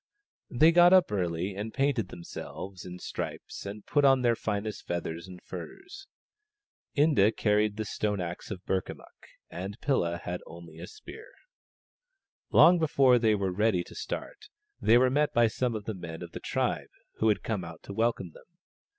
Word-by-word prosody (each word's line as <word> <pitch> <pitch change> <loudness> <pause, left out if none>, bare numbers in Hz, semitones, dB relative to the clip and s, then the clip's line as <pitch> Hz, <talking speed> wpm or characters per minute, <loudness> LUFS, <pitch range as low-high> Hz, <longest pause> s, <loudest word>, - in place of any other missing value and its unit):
They 155 +6 +5
got 175 +1 +7
up 185 - +5
early 90 -1 -1
and 105 +3 -5
painted 135 -6 +1
themselves 90 +2 -8
in 90 0 -7
stripes 95 - -6
and 100 +1 -8
put 145 - +2
on 135 -2 +5
their 120 -1 +3
finest 105 -1 -4
feathers 85 0 -4
and 90 -1 -10
furs. 385 - -9 0.9
Inda 115 -8 +4
carried 105 -1 +2
the 110 - -2
stone 105 0 -2
axe 85 -1 -5
of 95 -4 -7
Burkamukk, 95 -1 -5 0.2
and 95 +4 -6
Pilla 85 -12 0
had 90 +1 -5
only 85 -1 -12
a - - -7
spear. 430 +3 -12 1.2
Long 175 0 +7
before 135 -5 +4
they 110 -2 +3
were 95 -2 -1
ready 100 -1 +1
to - - -14
start - - -6 0.3
they 115 +2 +6
were 125 +1 +4
met 150 +2 +1
by 120 0 +5
some 115 +2 -1
of 105 -2 -5
the 110 - -3
men 85 -2 -7
of 85 - -9
the - - -7
tribe - - -2 0.3
who 110 - +1
had 105 -4 +2
come 105 -5 -2
out 85 -1 -10
to 100 - -8
welcome 110 -5 0
them. 170 - -19
105 Hz, 175 wpm, -29 LUFS, 90-130 Hz, 1.2 s, got